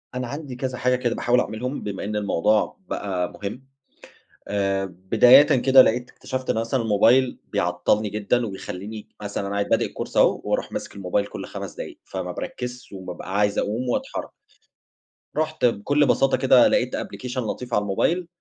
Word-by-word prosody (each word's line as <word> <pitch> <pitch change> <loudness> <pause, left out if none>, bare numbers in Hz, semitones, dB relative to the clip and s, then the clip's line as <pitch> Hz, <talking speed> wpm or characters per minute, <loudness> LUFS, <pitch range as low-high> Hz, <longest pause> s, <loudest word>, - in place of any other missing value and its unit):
أنا 125 -1 -2
عندي 140 0 -6
كذا 125 0 -3
حاجة 125 +1 +2
كده 120 -2 -1
باحاول 125 +1 +2
أعملهم، 125 +6 -3
بما 100 -2 -4
إن 105 +1 -3
الموضوع 105 +1 +1
بقى 95 -3 -2
مهم. 120 +7 -7 0.8
آآ، 100 -1 0
بدايةً 105 +9 +6 0.2
كده 130 0 +8
لقيت 125 +1 0
اكتشفت 130 0 -5
إنه 110 - +1
مثلًا 115 +2 -1
الموبايل 115 +4 +3
بيعطّلني 90 +5 +1
جدًا 105 +4 0
وبيخلّيني 100 +1 -7
مثلًا 100 -1 -3
أنا 100 - -3
قاعد 100 0 -1
بادئ - - +2
الcourse - - -6
أهو - - +4
وأروح - - -1
ماسك - - -5
الموبايل 100 +1 -1
كل - - -7
5 - - -7
دقايق، - - -8
فما - - -5
باركّزش 125 -1 -6
وبابقى 95 0 -5
عايز 105 -1 +2
أقوم 115 +5 -1
وأتحرّك. 120 - -3 1.1
رُحت 155 -3 0
بكل 140 +6 +2
بساطة 135 +1 +3
كده 130 -1 +6
لقيت 125 - +1
application 125 0 -6
لطيف 125 +1 -4
على 105 - +3
الموبايل 165 - 0
115 Hz, 165 wpm, -23 LUFS, 100-125 Hz, 1.1 s, كده